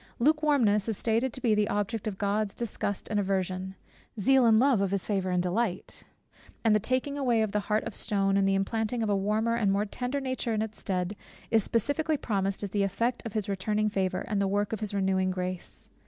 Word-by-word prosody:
Lukewarmness 270 Hz, -7 st, +3 dB
is 220 Hz, -, -1 dB
stated 230 Hz, +3 st, +1 dB
to 260 Hz, -, -7 dB
be 230 Hz, -3 st, +3 dB
the 210 Hz, 0 st, +2 dB
object 205 Hz, +2 st, -2 dB
of 200 Hz, -3 st, -3 dB
God's 205 Hz, 0 st, -1 dB
disgust 205 Hz, -3 st, -3 dB
and 210 Hz, -, +1 dB
aversion; 190 Hz, -1 st, -2 dB, 0.4 s
zeal 260 Hz, +4 st, +4 dB
and 220 Hz, -1 st, +6 dB
love, 255 Hz, -5 st, +4 dB
of 200 Hz, -, +1 dB
his 195 Hz, -1 st, -1 dB
favour 195 Hz, -3 st, -1 dB
and 180 Hz, -1 st, +1 dB
delight; 185 Hz, +1 st, -2 dB, 0.6 s
and 225 Hz, -2 st, +4 dB
the -, -, +4 dB
taking 255 Hz, +6 st, -1 dB
away 240 Hz, -5 st, +2 dB
of 215 Hz, -, -2 dB
the 210 Hz, -, +1 dB
heart 210 Hz, +1 st, 0 dB
of -, -, -6 dB
stone 195 Hz, -1 st, +1 dB
and 195 Hz, 0 st, +3 dB
the 195 Hz, -, +3 dB
implanting 220 Hz, +4 st, -1 dB
of 215 Hz, -, 0 dB
a -, -, +3 dB
warmer 215 Hz, +4 st, +1 dB
and 220 Hz, -4 st, +2 dB
more 200 Hz, +2 st, +1 dB
tender 250 Hz, +6 st, -3 dB
nature 260 Hz, -4 st, -2 dB
in 215 Hz, -, 0 dB
its 220 Hz, 0 st, -7 dB
stead, 185 Hz, 0 st, -2 dB, 0.4 s
is 225 Hz, -2 st, +4 dB
specifically 290 Hz, +9 st, 0 dB
promised 195 Hz, -5 st, -1 dB
as 200 Hz, -, -4 dB
the 205 Hz, -, 0 dB
effect 230 Hz, +5 st, 0 dB
of 215 Hz, -, -8 dB
his 215 Hz, -2 st, -1 dB
returning 210 Hz, +2 st, 0 dB
favour, 190 Hz, -2 st, -1 dB
and 210 Hz, -3 st, 0 dB
the 195 Hz, -, +2 dB
work 205 Hz, +2 st, 0 dB
of 220 Hz, -, -2 dB
his 215 Hz, -2 st, -3 dB
renewing 190 Hz, -1 st, +1 dB
grace. 185 Hz, -1 st, -4 dB
210 Hz, 220 wpm, -28 LUFS, 195-230 Hz, 0.6 s, and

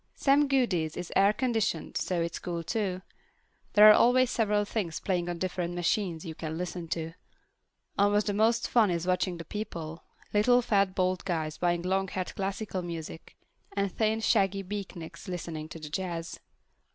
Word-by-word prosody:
Sam 285 Hz, +1 st, +3 dB
Goody's 195 Hz, -, +1 dB
is 180 Hz, -1 st, -5 dB
air 195 Hz, +1 st, +5 dB
conditioned, 220 Hz, -8 st, -1 dB
so 180 Hz, -2 st, -1 dB
it's 165 Hz, 0 st, -4 dB
cool 170 Hz, -2 st, -4 dB
too. 185 Hz, -1 st, -2 dB, 0.7 s
There 210 Hz, +1 st, +9 dB
are -, -, +9 dB
always 250 Hz, +3 st, +4 dB
several 210 Hz, -3 st, +1 dB
things 190 Hz, -7 st, -3 dB
playing 175 Hz, -2 st, -1 dB
on 175 Hz, -, -3 dB
different 175 Hz, -1 st, -2 dB
machines 175 Hz, -1 st, -1 dB
you 160 Hz, -, -5 dB
can 160 Hz, 0 st, -5 dB
listen 180 Hz, -1 st, -4 dB
to. 165 Hz, 0 st, -3 dB, 0.9 s
Almost 205 Hz, +1 st, +3 dB
the 205 Hz, -, 0 dB
most 225 Hz, +3 st, +2 dB
fun 225 Hz, -4 st, +4 dB
is 170 Hz, -1 st, -1 dB
watching 185 Hz, -1 st, 0 dB
the 165 Hz, -, -8 dB
people: 170 Hz, -5 st, -6 dB, 0.3 s
little, 245 Hz, +4 st, +4 dB
fat, 195 Hz, -4 st, +2 dB
bald 185 Hz, -1 st, 0 dB
guys 160 Hz, -5 st, -2 dB
buying 175 Hz, -1 st, +1 dB
long 190 Hz, +1 st, 0 dB
haired 185 Hz, 0 st, -4 dB
classical 195 Hz, 0 st, -3 dB
music, 165 Hz, -2 st, -7 dB, 0.4 s
and 200 Hz, -1 st, 0 dB
thin, 220 Hz, 0 st, +1 dB
shaggy 195 Hz, -3 st, +2 dB
beatniks 190 Hz, -4 st, -7 dB
listening 165 Hz, -3 st, -5 dB
to 165 Hz, -, -8 dB
the 155 Hz, -2 st, -8 dB
jazz. 165 Hz, 0 st, -4 dB
185 Hz, 165 wpm, -29 LUFS, 170-210 Hz, 0.9 s, There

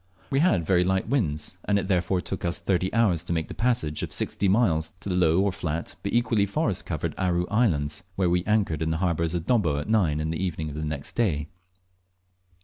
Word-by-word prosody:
We 135 Hz, -, +2 dB
had 110 Hz, -, +3 dB
very 90 Hz, +1 st, +3 dB
light 95 Hz, +1 st, 0 dB
winds, 90 Hz, -, -1 dB
and 105 Hz, -, +2 dB
it 95 Hz, -, -1 dB
therefore 90 Hz, -1 st, +1 dB
took 95 Hz, -, -5 dB
us 85 Hz, -2 st, 0 dB
thirty 95 Hz, +1 st, 0 dB
hours 100 Hz, -8 st, +2 dB
to 85 Hz, -, -2 dB
make 80 Hz, -2 st, -2 dB
the -, -, -5 dB
passage 115 Hz, -11 st, 0 dB
of -, -, -4 dB
sixty 100 Hz, -, -1 dB
miles 90 Hz, -7 st, +2 dB
to -, -, -5 dB
the 90 Hz, -, 0 dB
low, 85 Hz, 0 st, +3 dB
or 100 Hz, 0 st, +2 dB
flat, 85 Hz, -4 st, -4 dB
but -, -, -3 dB
equally 115 Hz, -4 st, +2 dB
forest 100 Hz, -, -1 dB
covered 80 Hz, -1 st, -2 dB
Aru 90 Hz, -2 st, +1 dB
Islands, 80 Hz, -9 st, +1 dB
where 95 Hz, -2 st, +1 dB
we 90 Hz, 0 st, +2 dB
anchored 100 Hz, -8 st, +1 dB
in 80 Hz, -, 0 dB
the 80 Hz, -, 0 dB
harbour 85 Hz, -2 st, 0 dB
of 85 Hz, 0 st, -2 dB
Dobbo 90 Hz, -, +2 dB
at 75 Hz, -, -4 dB
nine 90 Hz, -9 st, +2 dB
in 80 Hz, +1 st, -2 dB
the 80 Hz, +3 st, -2 dB
evening 85 Hz, -4 st, -2 dB
of 75 Hz, -, -8 dB
the 75 Hz, -, -4 dB
next 75 Hz, -2 st, -5 dB
day. 80 Hz, -10 st, 0 dB
90 Hz, 225 wpm, -26 LUFS, 80-100 Hz, -, had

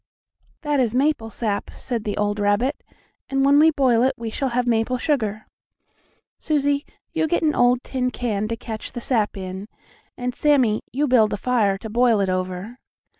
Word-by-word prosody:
"That 295 Hz, -2 st, +1 dB
is 240 Hz, -2 st, +1 dB
maple 270 Hz, -4 st, +1 dB
sap," 215 Hz, -3 st, -3 dB
said 235 Hz, -4 st, -4 dB
the 205 Hz, -, -2 dB
old 205 Hz, 0 st, 0 dB
rabbit, 205 Hz, +6 st, +1 dB, 0.5 s
"and 270 Hz, 0 st, +1 dB
when 285 Hz, +1 st, +5 dB
we 315 Hz, +1 st, +7 dB
boil 260 Hz, -6 st, +2 dB
it 260 Hz, +2 st, +2 dB
we 230 Hz, -1 st, -5 dB
shall 270 Hz, +4 st, -2 dB
have 245 Hz, 0 st, 0 dB
maple 235 Hz, +1 st, +1 dB
sugar. 220 Hz, -7 st, -1 dB, 0.9 s
Susie, 285 Hz, -2 st, 0 dB, 0.3 s
you 320 Hz, -1 st, +1 dB
get 345 Hz, +2 st, 0 dB
an 305 Hz, -1 st, +3 dB
old 245 Hz, 0 st, +3 dB
tin 255 Hz, -1 st, -1 dB
can 215 Hz, -5 st, -2 dB
to 230 Hz, -, -2 dB
catch 220 Hz, -1 st, -7 dB
the 245 Hz, -, -4 dB
sap 225 Hz, -5 st, 0 dB
in, 190 Hz, +1 st, -6 dB, 0.5 s
and 250 Hz, 0 st, -3 dB
Sammie, 255 Hz, -7 st, +2 dB
you 285 Hz, +4 st, 0 dB
build 230 Hz, -5 st, +4 dB
a -, -, -1 dB
fire 215 Hz, -5 st, +1 dB
to 220 Hz, -, -8 dB
boil 230 Hz, 0 st, +3 dB
it 195 Hz, -1 st, +1 dB
over." 185 Hz, +6 st, -3 dB
240 Hz, 180 wpm, -22 LUFS, 215-270 Hz, 0.9 s, we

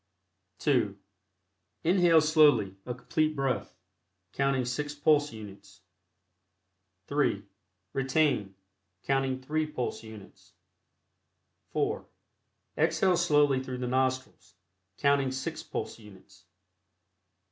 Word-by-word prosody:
(2) -, -, +1 dB, 0.9 s
Inhale 175 Hz, -2 st, +5 dB
slowly 145 Hz, -, +4 dB
a 125 Hz, -, -3 dB
Complete 155 Hz, +4 st, 0 dB
Breath, 135 Hz, -3 st, -2 dB, 0.6 s
counting 135 Hz, -2 st, +1 dB
six 145 Hz, +4 st, -3 dB
pulse 150 Hz, 0 st, +3 dB
units. 100 Hz, -3 st, -12 dB, 1.2 s
(3) 140 Hz, -8 st, 0 dB, 0.5 s
Retain, 135 Hz, -7 st, +1 dB, 0.5 s
counting 135 Hz, -1 st, 0 dB
three 155 Hz, +3 st, -1 dB
pulse 130 Hz, -5 st, -4 dB
units. 110 Hz, -3 st, -13 dB, 1.2 s
(4) -, -, -1 dB, 0.7 s
Exhale 185 Hz, -2 st, +3 dB
slowly 145 Hz, -6 st, +3 dB
through 130 Hz, -1 st, -5 dB
the 125 Hz, -, -3 dB
nostrils, 130 Hz, -4 st, -2 dB, 0.4 s
counting 140 Hz, -2 st, +2 dB
six 130 Hz, 0 st, -4 dB
pulse -, -, -5 dB
units. 95 Hz, -2 st, -17 dB
135 Hz, 90 wpm, -29 LUFS, 115-150 Hz, 1.2 s, Inhale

